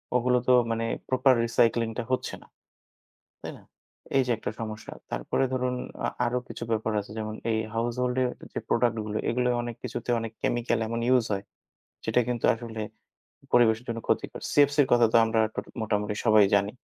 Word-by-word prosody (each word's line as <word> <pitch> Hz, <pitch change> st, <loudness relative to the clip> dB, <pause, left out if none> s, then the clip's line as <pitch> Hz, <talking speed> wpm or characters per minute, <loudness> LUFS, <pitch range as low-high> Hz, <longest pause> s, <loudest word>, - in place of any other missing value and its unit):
ওগুলো 125 Hz, 0 st, +3 dB
তো 130 Hz, -, +6 dB, 0.2 s
মানে 115 Hz, 0 st, -1 dB, 0.2 s
proper 130 Hz, 0 st, +4 dB
recycling 115 Hz, 0 st, +2 dB
টা 120 Hz, -, -1 dB
হচ্ছে 130 Hz, -, -1 dB
না। -, -, -21 dB, 1.0 s
তাই -, -, -6 dB
না? -, -, -19 dB, 0.5 s
এই 135 Hz, -, +5 dB
যে -, -, -2 dB
একটা -, -, -3 dB
সমস্যা। 110 Hz, -1 st, -6 dB, 0.2 s
তারপরে -, -, 0 dB
ধরুন 125 Hz, 0 st, 0 dB, 0.3 s
আ -, -, 0 dB, 0.2 s
আরও 125 Hz, +1 st, 0 dB
কিছু 115 Hz, -, -6 dB
ব্যাপার 110 Hz, 0 st, 0 dB
আছে 105 Hz, +1 st, -10 dB
যেমন 110 Hz, 0 st, -4 dB, 0.2 s
এই 110 Hz, -, +1 dB, 0.2 s
household-এর 125 Hz, +2 st, 0 dB, 0.2 s
যে -, -, -3 dB
productগুলো, 110 Hz, -3 st, 0 dB
এগুলাও 125 Hz, +1 st, +1 dB
অনেক 120 Hz, -1 st, -5 dB
কিছুতে 120 Hz, -, -4 dB
অনেক 115 Hz, -1 st, -5 dB
chemical 120 Hz, -1 st, 0 dB
এমন 115 Hz, +1 st, -2 dB
use 120 Hz, -3 st, +2 dB
হয়, 100 Hz, 0 st, -2 dB, 0.6 s
যেটা 125 Hz, -, +2 dB
কিন্তু 120 Hz, -2 st, -3 dB
আসলে 115 Hz, -1 st, -6 dB, 0.7 s
পরিবেশের 115 Hz, -1 st, +4 dB
জন্য 115 Hz, 0 st, -2 dB
ক্ষতিকর। -, -, -1 dB
CFC-র 145 Hz, 0 st, +4 dB
কথা 120 Hz, -1 st, +6 dB
তো -, -, +7 dB
আমরা 115 Hz, 0 st, +1 dB, 0.2 s
ট -, -, -18 dB, 0.2 s
মোটামুটি 105 Hz, -1 st, -1 dB
সবাই 110 Hz, -2 st, +6 dB
জানি। 100 Hz, +2 st, +1 dB
115 Hz, 170 wpm, -27 LUFS, 110-125 Hz, 1.0 s, তো